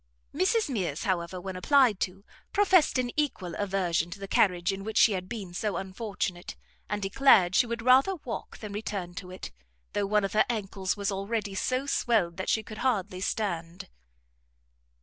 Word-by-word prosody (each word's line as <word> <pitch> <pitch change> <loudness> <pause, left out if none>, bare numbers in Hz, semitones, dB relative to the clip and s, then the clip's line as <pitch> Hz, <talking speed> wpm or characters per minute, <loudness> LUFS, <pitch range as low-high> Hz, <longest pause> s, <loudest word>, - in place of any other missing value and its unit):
Mrs 380 +8 +2
Mears, 185 - -2
however, 185 -3 -1
when 190 +1 -6
applied 245 0 +4
to, 195 +2 -4 0.3
professed 380 -8 +4
an 245 -1 0
equal 265 - -1
aversion 185 -4 0
to 180 - -7
the 195 - -6
carriage 180 -2 +2
in 195 0 -6
which 220 +1 -4
she 225 - +6
had 185 -2 -3
been 205 -7 -6
so 210 +3 -2
unfortunate, 190 -2 -4 0.3
and 210 -1 -2
declared 195 -3 +5
she 240 - +4
would 235 0 -4
rather 265 +10 +5
walk 255 -8 -7
than 210 -2 -8
return 200 -4 -4
to 180 0 -8
it, 185 - -8 0.4
though 200 -1 0
one 210 0 +2
of 195 - -2
her 215 - +4
ancles 195 -4 -2
was 200 0 -1
already 200 +1 -2
so 255 +7 -1
swelled 215 -11 +1
that 190 - -3
she 220 - +1
could 215 +1 -9
hardly 195 -7 -1
stand. 175 -5 -3
200 Hz, 175 wpm, -28 LUFS, 185-230 Hz, 0.4 s, she